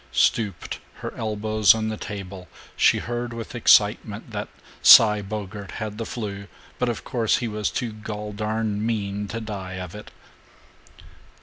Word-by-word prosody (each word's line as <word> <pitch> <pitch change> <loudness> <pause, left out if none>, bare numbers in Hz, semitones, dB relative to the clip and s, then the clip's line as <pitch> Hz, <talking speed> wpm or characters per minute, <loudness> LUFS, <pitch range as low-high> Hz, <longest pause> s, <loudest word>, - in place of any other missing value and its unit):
Stooped, 105 -6 0 0.2
her - - -5
elbows 110 -1 +3
on 110 0 -2
the 110 - -3
table, 95 -3 -7 0.3
she - - +4
heard 120 0 -4
with 115 -1 -7
excitement - - +3
that - - -4 0.3
"Cy 105 -2 +8
Bogart 100 0 -6
had 110 -1 -5
the 115 - -3
'flu, 100 -5 -5 0.3
but 125 - +1
of 120 - -4
course 115 -3 +1
he 120 - -2
was 105 -2 -2
too 120 -3 -3
gol 105 -1 -6
darn 105 0 -2
mean 105 -2 -2
to 115 - -4
die 100 -4 -6
of 90 -1 -6
it." 105 0 -10
105 Hz, 150 wpm, -24 LUFS, 100-110 Hz, 0.3 s, Cy